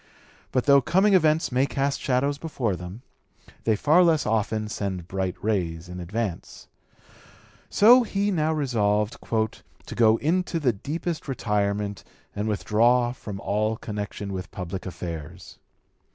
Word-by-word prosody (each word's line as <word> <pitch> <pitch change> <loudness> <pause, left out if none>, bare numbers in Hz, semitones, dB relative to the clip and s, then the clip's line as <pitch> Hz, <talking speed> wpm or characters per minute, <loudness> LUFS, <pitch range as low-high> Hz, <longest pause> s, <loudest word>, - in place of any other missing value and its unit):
But 130 - 0
though 140 -1 +6
coming 190 +10 +3
events 160 -3 +3
may 130 +3 +2
cast 140 0 -1
shadows 140 +2 0
before 130 - -2
them, 90 +7 -9 0.6
they 110 - +3
far 150 - +4
less 165 -3 +3
often 110 0 0
send 95 -5 -4
bright 95 -1 -2
rays 90 -6 -1
in 90 0 -7
advance. 100 +1 -5 1.0
So 240 +5 +7
he 205 -3 -1
now 160 -4 +1
resolved 110 -8 0
"to 110 -1 -4
go 110 -1 +5
into 170 +4 0
the 130 -6 +2
deepest 160 - -4
retirement 105 -5 -1 0.3
and 105 +1 -2
withdraw 120 +4 +2
from 105 -5 -8
all 110 +2 0
connection 105 -2 -5
with 90 -1 -5
public 90 +1 -6
affairs." 85 -1 -8
110 Hz, 135 wpm, -25 LUFS, 100-145 Hz, 1.0 s, So